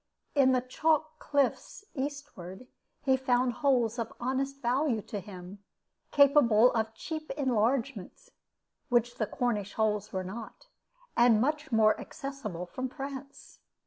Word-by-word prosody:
In 270 -3 +5
the 255 -1 +3
chalk 310 +4 0
cliff's 285 +7 -1
eastward 265 - -6 0.4
he 265 -1 +4
found 250 -1 +1
holes 245 -4 +1
of 230 -1 -3
honest 270 +2 -2
value 255 -1 +1
to 205 - -5
him, 185 0 -10 0.5
capable 260 -5 +6
of 225 -1 -1
cheap 310 +5 -6
enlargement 260 - -1 0.6
(which 240 -1 +2
the 215 - +1
Cornish 210 -3 -1
holes 210 -2 0
were 185 0 -2
not), 215 +5 -8 0.5
and 235 -2 +5
much 300 +4 -1
more 220 -1 +4
accessible 270 - -6
from 255 +8 -4
France. 275 0 -8
250 Hz, 125 wpm, -30 LUFS, 220-275 Hz, 0.6 s, capable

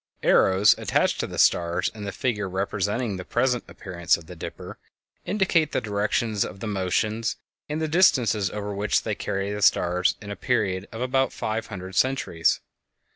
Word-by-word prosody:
Arrows 95 +2 +5
attached - - +1
to - - -1
the - - -8
stars 85 +1 +2
in 105 -2 -7
the 100 - -3
figure 105 -6 -2
representing 100 +3 -1
the 90 - -6
present 125 +3 0
appearance 85 -4 -1
of 85 - -13
the 90 - -10
"Dipper" 80 - -8 0.5
indicate 180 -6 +1
the - - +2
directions 105 0 0
of 95 - -7
the 115 - -5
motions 105 +3 -1 0.3
and 150 +1 -2
the 160 - -1
distances 125 - +3
over 105 0 -5
which 100 +1 0
they - - -3
will - - -1
carry 100 +1 -2
the 105 - -4
stars 90 -2 +3
in 100 -1 -8
a - - -4
period 100 -7 -1
of 115 - -7
about 130 +1 +1
five 110 +1 -3
hundred 95 -2 -7
centuries. 130 -9 +1
105 Hz, 180 wpm, -25 LUFS, 95-120 Hz, 0.5 s, Arrows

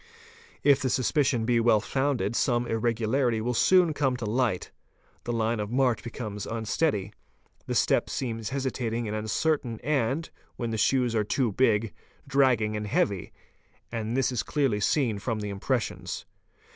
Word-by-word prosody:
If 140 -2 +5
the 130 - 0
suspicion 130 -2 +1
be 120 0 +3
well 115 -2 +4
foun 135 +4 0
ded 100 +2 -2
some 120 -2 +1
irregularity 115 +1 0
will 120 +3 -1
soon 180 +5 +4
come 135 -3 0
to 115 +1 -2
ight: 110 -8 -1 0.5
the 120 - -2
line 115 -1 0
of 105 -1 -3
march 125 -1 +2
becomes 105 -4 -6
unsteady, 110 -2 -1 0.5
the - - -2
step - - +2
seems 115 -4 -3
hesitating 125 -4 -2
and 105 - -3
uncertain 115 +2 -1
and, 140 +2 0 0.3
when 120 -2 -3
the 110 - -2
shoes 125 0 +2
are 110 -2 +2
too 120 +2 0
big, 110 -1 +2 0.3
dragging 130 -6 +2
and 105 0 -3
heavy, 100 -2 0 0.6
and 115 +1 -2
this 135 -1 +2
is 125 - 0
clearly 135 -8 0
seen 115 -1 +1
from 110 +1 -2
the 105 -1 -4
impres 120 +5 0
sions. - - -6
120 Hz, 160 wpm, -27 LUFS, 110-130 Hz, 0.6 s, If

